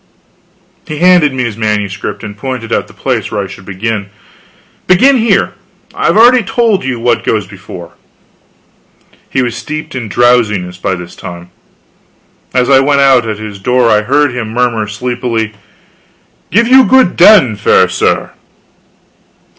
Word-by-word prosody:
He 155 - -5
handed 175 -3 +4
me 130 -1 -3
his 115 -3 -3
manuscript, 105 -3 -3
and 105 -1 -7
pointed 120 0 -5
out - - -1
the - - -17
place - - -2
where 105 -1 -3
I - - -5
should 95 0 -11
begin: 100 +1 -4 0.8
"Begin 255 +10 +4
here 230 -1 +1 0.4
I've - - 0
already 245 +2 +6
told 220 - 0
you 130 -3 -3
what 120 +1 0
goes 105 -3 -1
before." 95 -3 -11 1.4
He 130 - 0
was 120 -2 -3
steeped 155 +6 -6
in 120 -5 -5
drowsiness 105 -6 +1
by 95 0 -2
this 90 -1 -10
time. 85 0 -10 1.0
As 125 -1 +1
I 135 -1 +5
went 140 +1 +2
out 130 -4 +3
at 105 - -4
his 105 -2 -8
door 125 +3 +1
I 105 - +3
heard 140 +4 +1
him 120 -3 -4
murmur 115 -2 -1
sleepily: 115 0 -3 1.0
"Give 230 +4 +2
you 260 +1 +6
good 260 -8 +3
den, 175 - +5
fair 100 -2 +3
sir." 95 +1 -1
120 Hz, 150 wpm, -12 LUFS, 105-140 Hz, 1.4 s, already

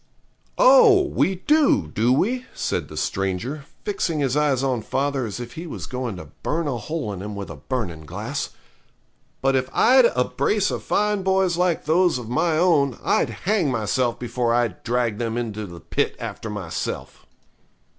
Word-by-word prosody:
'Oh! - - +7
we 195 - +1
do, 290 - +3
do 115 +9 +1
we?' 245 - +1
said - - -2
the - - -10
stranger, 100 +10 -2 0.2
fixing 195 -5 -1
his 135 -3 0
eyes 145 -3 +2
on 130 -4 0
father 135 0 -1
as 100 0 -6
if 120 -1 -7
he 170 +2 -7
was - - -6
going 125 -4 -4
to 80 -4 -10
burn 160 +1 -1
a 130 -4 -1
hole 130 -3 -4
in 95 - -7
him 105 +1 -6
with 100 -1 -6
a - - -7
burning 90 - -4
glass; - - -4 0.9
'but 135 0 +3
if 130 0 0
I'd 255 0 +5
a 125 - +2
brace 205 +11 0
of - - -3
fine 210 -1 +1
boys 190 -2 +2
like 180 -1 0
those 170 0 +3
of 120 -3 -7
my 155 +6 +1
own 150 -7 +3
I'd - - +2 0.2
hang 195 -6 +2
myself 120 +1 0
before 120 -1 -1
I'd 120 -2 0
drag 120 -3 -1
them 115 -1 -2
into 110 -3 -4
the 85 -1 -10
pit - - -1
after 115 - -6
myself.' 95 -6 -5
130 Hz, 175 wpm, -23 LUFS, 115-180 Hz, 0.9 s, Oh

